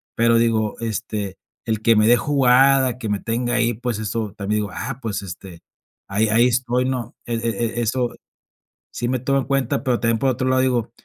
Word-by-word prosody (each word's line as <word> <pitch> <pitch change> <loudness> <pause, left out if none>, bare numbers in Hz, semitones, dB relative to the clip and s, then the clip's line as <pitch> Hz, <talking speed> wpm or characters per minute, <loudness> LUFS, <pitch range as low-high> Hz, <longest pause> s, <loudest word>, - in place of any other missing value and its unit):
Pero, 115 0 +3
digo, 110 -2 +1
este, 110 -3 -4 0.3
el 110 -2 -1
que 115 +1 +4
me 105 0 +4
dé 120 +1 +6
jugada, 130 0 +3
que 110 - -4
me 105 -1 0
tenga 120 +2 -1
ahí, 120 0 +2
pues, 120 0 -3
eso 110 -1 -3
también 105 +1 -1
digo, 105 - -4
ah, 125 +8 -5
pues, 105 -3 -3
este, 90 -1 -9 0.5
ahí 105 +3 +1
ahí 115 +3 +4
estoy, 125 0 0
¿no? 125 -3 -3
E 120 - -4
e 115 +1 -2
eso 120 +1 -1 0.8
si 120 - -3
me 130 0 0
toma 135 +3 +1
en - - -4
cuenta. 135 0 0
Pero 125 -3 +1
también, 115 -1 +1
por 135 +2 +2
otro 130 +1 -1
lado, 130 0 +3
digo, 125 -3 0
115 Hz, 200 wpm, -21 LUFS, 110-125 Hz, 0.8 s, dé